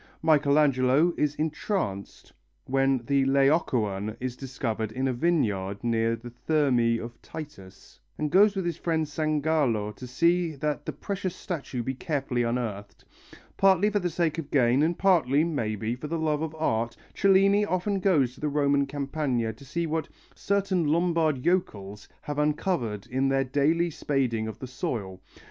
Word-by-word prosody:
Michelangelo 145 0 +3
is 150 -1 0
entranced 155 - -3 0.3
when 135 -2 +1
the 140 0 +2
Laocoön 125 - +1
is 125 -1 -4
discovered 120 -5 -4
in 130 +4 -1
a 130 - 0
vineyard 110 - 0
near 115 -1 +1
the 120 +1 -10
Thermæ 120 -4 +1
of 115 0 -9
Titus, 100 -12 -11 0.2
and 150 -1 -2
goes 205 +3 +5
with 190 -2 -2
his 170 -2 -2
friend 160 -2 0
Sangallo 150 -8 0
to 125 - -9
see 170 +5 +1
that 145 +1 -3
the - - -1
precious 190 -2 -4
statue 145 - -5
be 130 - -2
carefully 135 -3 -2
unearthed. 115 -4 -3 0.5
Partly 195 +1 +4
for 205 - +1
the 180 -2 -1
sake 165 -1 -1
of 150 -3 -6
gain, 130 -1 +3
and 165 +2 +1
partly, 155 -7 +3
maybe, 115 -8 -2
for 140 +4 -7
the 165 +2 -2
love 155 -2 0
of 160 -1 -4
art, 115 -7 -1 0.2
Cellini 195 +1 +4
often 195 0 -1
goes 150 -10 +2
to - - -17
the 150 - 0
Roman 140 -1 +2
Campagna 135 -5 -2
to 130 - -16
see 165 +5 -3
what 160 -1 -2 0.2
"certain 195 -4 0
Lombard 160 -4 +1
yokels" 105 - -1
have 145 0 -4
uncovered 150 - -1
in 135 +2 0
their 135 0 +2
daily 150 +6 +1
spading 125 -7 -1
of 110 - -6
the - - -7
soil. 120 - -4
140 Hz, 160 wpm, -27 LUFS, 120-165 Hz, 0.5 s, goes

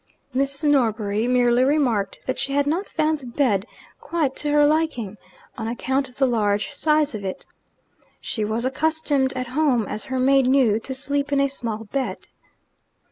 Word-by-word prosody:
Mrs. 275 +3 +1
Norbury 220 -5 +1
merely 245 0 +3
remarked 255 -9 +1
that 260 - -2
she 275 - -2
had 285 0 +2
not 335 +7 -1
found 310 -1 0
the 260 - -10
bed 235 -5 0 0.3
quite 310 -6 -1
to 295 - -2
her 295 0 +5
liking, 290 -10 0 0.4
on 225 - -3
account 265 +3 -1
of 250 - -20
the 270 - +2
large 210 -3 0
size 300 -1 +2
of 210 -2 -5
it. 190 -1 -5 0.7
She 220 - -4
was 220 +3 -2
accustomed 290 -1 0
at 255 -1 -4
home, 260 -5 +2
as 210 - -4
her 260 - -3
maid 270 0 +4
knew, 255 -5 +3
to 265 +3 -4
sleep 285 +1 -2
in 280 - +2
a 275 - +3
small 230 -5 -3
bed. 260 +5 -4
265 Hz, 175 wpm, -23 LUFS, 230-285 Hz, 0.7 s, her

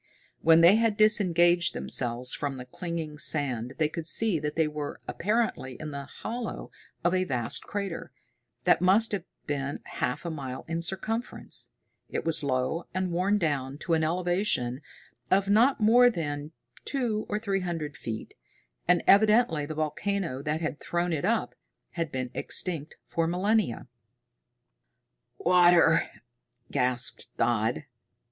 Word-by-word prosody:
When 165 0 +6
they 175 +5 +7
had 225 -2 +1
disengaged 175 -5 +4
themselves 125 0 +3
from 140 -2 -3
the 125 - -8
clinging 160 +1 -5
sand 130 -6 0
they 155 - +2
could 160 +1 -6
see 210 -3 +2
that 150 0 -3
they 160 -1 +2
were 150 -1 -5
apparently 170 - -1
in 155 -1 -6
the 140 -1 -6
hollow 230 - -6 0.3
of 175 +1 +2
a 185 0 +2
vast 125 -8 -1
crater, 200 -4 -4 0.5
that - - +4
must 200 +5 +4
have 195 -5 -2 0.2
been 140 -1 -3
half 125 - -3
a 170 - -2
mile 130 -4 -6
in 165 +1 -2
circumference. 220 +7 -3 0.4
It - - -3
was 165 -2 +3
low 135 +5 -1
and 185 -1 -1
worn 185 +4 +2
down 140 -6 -1
to 170 - -1
an 160 -1 +2
elevation 175 -6 0 0.5
of 195 +1 +3
not 235 +7 +4
more 240 +3 +6
than 150 -7 -4 0.3
two 235 -6 -2
or 210 - 0
three 200 -3 -1
hundred 165 -5 -4
feet, 110 -1 -6 0.5
and 175 0 +4
evidently 210 -7 +4
the 155 - -5
volcano 155 -1 -2
that 150 +2 -2
had 155 -2 -3
thrown 175 0 -1
it 160 +2 -1
up 225 +2 0 0.4
had 165 -4 -3
been 130 -1 -3
extinct 160 -5 -3
for 165 -1 -1
millennia. 185 - 0 1.5
"Water!" 175 -2 +5 0.6
gasped 125 -2 -1
Dodd. - - +1
165 Hz, 140 wpm, -28 LUFS, 145-195 Hz, 1.5 s, they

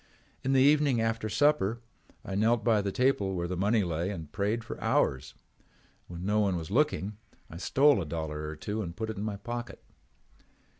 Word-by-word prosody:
In 135 - +1
the 130 - +5
evening 145 -3 +4
after 115 -1 -1
supper 120 -2 +2 0.5
I 95 - -5
knelt 110 +3 +2
by 110 -3 +3
the 100 0 -2
table 105 -6 +1
where 85 -1 -2
the 90 - -3
money 105 +4 +2
lay 85 +1 -2
and 80 -7 -6
prayed 105 +3 -1
for 115 - -8
hours. 65 0 +1 0.7
When 90 +1 -7
no 105 +2 +2
one 100 -3 +2
was 80 +2 -6
looking 110 -6 +1 0.3
I 85 - -8
stole 135 +6 +4
a - - -3
dollar 75 -1 -4
or 75 - -5
two 105 +8 -4
and 85 -4 -6
put 110 0 -3
it 110 - -9
in 100 - -3
my 105 -2 -3
pocket. 120 +3 -6
105 Hz, 195 wpm, -29 LUFS, 90-120 Hz, 0.7 s, the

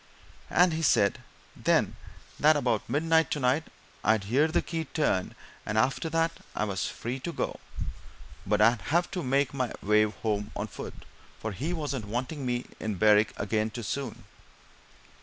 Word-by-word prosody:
"And 180 -1 +4
he 160 - -1
said, 100 -10 +3 0.4
then, - - +2 0.4
that 155 +1 +6
about 120 -7 0
midnight, 160 +2 +3
tonight, 145 +2 +1 0.4
I'd 110 0 +3
hear 130 +10 +3
the 160 - +1
key 165 -1 -3
turned, 135 - 0 0.3
and 110 - -2
after 135 +8 +2
that 165 +1 +2 0.2
I - - 0
was 100 -4 -1
free 125 +3 -4
to 170 - -4
go, - - -3 0.8
but 105 +2 +1
I'd 115 +1 +5
have 175 +3 +2
to 180 - -2
make 140 0 +1
my 130 -3 -1
way 105 +1 +5
home 105 -1 -2
on - - -2
foot, - - -9 0.3
for 110 - -3
he 140 - -3
wasn't 145 -9 -3
wanting 125 +6 -3
me 120 0 0
to - - -20
be - - -19
in 110 -2 -1
Berwick 105 +2 +5
again 110 +1 0
too 120 +1 -6
soon." 130 +2 -4
125 Hz, 170 wpm, -28 LUFS, 105-155 Hz, 0.8 s, that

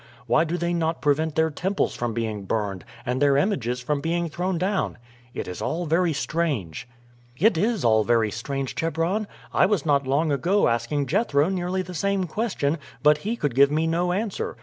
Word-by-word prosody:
Why 155 +7 +3
do 170 +2 -2
they 175 0 -1
not 165 -1 0
prevent 150 +1 +1
their 160 0 +2
temples 190 +6 -1
from 120 -2 -3
being 110 -4 -3
burned 100 -3 -2 0.2
and 125 +2 -1
their 140 -1 +4
images 130 - 0
from 145 +3 -1
being 170 +1 -1
thrown 175 +3 -2
down? 190 +3 -1 0.4
It - - -4
is 90 - -6
all 175 +2 -2
very 165 +2 +2
strange." 140 - -2 0.5
"It 200 - +4
is 210 - 0
all 110 -1 +4
very 115 -2 +2
strange, 135 +4 -4
Chebron. 165 +6 -1 0.3
I - - +4
was 205 -5 0
not 140 -3 +2
long 150 +4 +1
ago 175 +9 +2
asking 120 +5 0
Jethro 150 - +2
nearly 185 0 -1
the 180 0 -9
same 200 +2 0
question, 170 -5 -1 0.2
but 150 0 +5
he 215 +9 -2
could 145 - -1
give 140 +3 +5
me 155 +2 +1
no 170 +2 +1
answer. 200 - -2
160 Hz, 190 wpm, -24 LUFS, 135-180 Hz, 0.5 s, but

